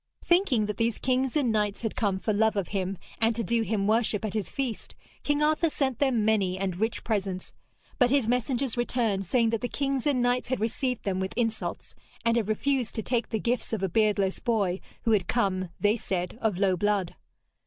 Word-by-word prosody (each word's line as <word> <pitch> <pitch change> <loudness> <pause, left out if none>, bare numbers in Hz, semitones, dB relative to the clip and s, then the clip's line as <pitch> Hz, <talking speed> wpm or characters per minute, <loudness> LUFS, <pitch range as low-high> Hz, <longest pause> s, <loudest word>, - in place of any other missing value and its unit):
Thinking 345 - +3
that 210 -1 -4
these 230 -1 +1
kings 260 +1 0
and 275 -6 +2
knights 210 0 0
had 225 - -2
come 200 -3 0
for 215 +3 -1
love 220 +1 +2
of 200 -3 -1
him, 195 -1 -2 0.2
and 225 0 +2
to 230 - -1
do 230 +3 +1
him 215 -3 0
worship 220 0 +1
at 210 - -3
his 210 -5 -2
feast, 255 -6 -4 0.3
King 290 0 +1
Arthur 310 +2 +3
sent 265 -5 -1
them 255 -6 +2
many 200 -4 +2
and 190 -2 -2
rich 225 +1 -1
presents. 195 -4 -2 0.5
But 250 -2 +5
his 270 -3 +2
messengers 250 +1 0
returned, 230 -5 0
saying 230 +2 +2
that 230 - -1
the 245 - -1
kings 275 0 -1
and 280 -3 +2
knights 245 +1 +1
had 260 - 0
received 245 +3 -1
them 190 -2 -1
with 190 +3 -4
insults, 225 -2 -2 0.3
and 230 0 +3
had 230 -4 +1
refused 250 +3 0
to 220 - -2
take 240 0 -1
the 225 - 0
gifts 235 +2 -1
of 205 -3 -1
a 190 - +1
beardless 205 -1 +1
boy 200 -6 0 0.2
who 230 - +2
had 195 -5 +2
come, 185 -6 0
they 210 +2 +3
said, 180 -4 -3
of 215 -5 +1
low 190 -1 +3
blood. 200 -1 0
225 Hz, 210 wpm, -27 LUFS, 200-245 Hz, 0.5 s, But